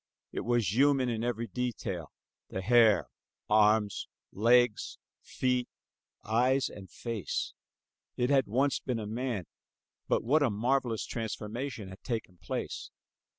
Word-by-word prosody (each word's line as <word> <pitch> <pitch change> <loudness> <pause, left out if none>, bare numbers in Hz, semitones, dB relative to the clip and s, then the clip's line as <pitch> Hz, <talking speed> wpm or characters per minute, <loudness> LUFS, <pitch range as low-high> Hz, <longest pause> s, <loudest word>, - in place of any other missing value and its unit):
It - - -3
was 120 -6 +1
human 135 0 +4
in 115 -1 -2
every 120 -1 -1
detail, 110 - -4 0.4
the 95 - -4
hair, 110 -3 +5 0.4
arms, 105 -1 +3 0.2
legs, 120 +1 +3 0.2
feet, 125 -1 -1 0.5
eyes 125 +4 +2
and 95 -2 -11
face. 115 - -3 0.6
It 125 +2 +1
had 135 -3 +4
once 135 +6 +2
been 125 -3 -2
a 110 - -4
man, 115 -3 -2 0.6
but - - +1
what 145 +7 +3
a 140 - +4
marvelous 120 +2 0
transformation 115 0 -4
had 95 - -11
taken 110 -8 -4
place! - - -4
115 Hz, 125 wpm, -30 LUFS, 105-125 Hz, 0.6 s, hair